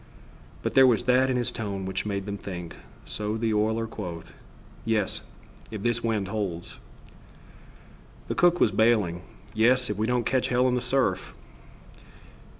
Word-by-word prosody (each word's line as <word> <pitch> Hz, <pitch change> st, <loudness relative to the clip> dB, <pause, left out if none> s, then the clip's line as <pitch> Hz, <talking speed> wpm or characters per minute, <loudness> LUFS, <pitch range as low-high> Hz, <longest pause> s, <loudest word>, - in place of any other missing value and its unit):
But -, -, -1 dB
there 135 Hz, -1 st, +7 dB
was 120 Hz, -2 st, +3 dB
that 130 Hz, +1 st, +3 dB
in 130 Hz, -, +1 dB
his 120 Hz, -, 0 dB
tone 100 Hz, -3 st, -4 dB
which 95 Hz, +2 st, -3 dB
made 100 Hz, -2 st, -2 dB
them 100 Hz, -1 st, -4 dB
think, 90 Hz, -3 st, -7 dB, 0.3 s
so 105 Hz, +1 st, -3 dB
the 110 Hz, -1 st, 0 dB
oiler 110 Hz, +2 st, +1 dB
quoth: 90 Hz, -7 st, -7 dB, 0.5 s
"Yes! 110 Hz, -3 st, 0 dB, 0.5 s
If 110 Hz, -3 st, -6 dB
this 120 Hz, 0 st, 0 dB
wind 110 Hz, -4 st, 0 dB
holds!" 95 Hz, -5 st, -4 dB, 1.5 s
The -, -, -1 dB
cook 175 Hz, 0 st, +4 dB
was -, -, +4 dB
bailing: 105 Hz, -5 st, +2 dB, 0.3 s
"Yes! 125 Hz, +2 st, +3 dB
If 105 Hz, -, -4 dB
we 110 Hz, +1 st, 0 dB
don't 125 Hz, -1 st, +1 dB
catch 130 Hz, -1 st, +1 dB
hell 125 Hz, +1 st, +3 dB
in 125 Hz, -, +1 dB
the 125 Hz, -, 0 dB
surf." 125 Hz, -10 st, 0 dB
110 Hz, 155 wpm, -26 LUFS, 100-125 Hz, 1.5 s, there